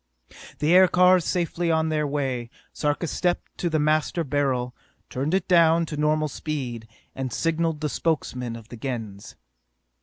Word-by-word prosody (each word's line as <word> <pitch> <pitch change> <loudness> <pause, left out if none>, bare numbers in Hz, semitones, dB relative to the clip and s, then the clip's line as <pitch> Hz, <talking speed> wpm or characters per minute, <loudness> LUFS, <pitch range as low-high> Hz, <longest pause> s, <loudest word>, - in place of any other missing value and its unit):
The 150 +4 +2
aircars 180 -1 +5
safely 175 -1 -1
on 160 -1 +2
their 150 -1 0
way, 135 -5 -2 0.2
Sarka 150 +3 -1
stepped 175 +2 -2
to 175 - 0
the 160 - +1
Master 155 +2 +1
Beryl, 135 -4 -1 0.4
tuned 140 +7 -1
it 190 - -1
down 170 -2 +4
to 155 - -6
normal 155 +1 +1
speed, 130 -7 -5 0.3
and 130 -2 -4
signalled 165 +1 -1
the 155 - 0
Spokesmen 125 -6 -2
of 115 0 -12
the 120 - -9
Gens. 110 -6 -6
150 Hz, 150 wpm, -24 LUFS, 130-165 Hz, 0.4 s, aircars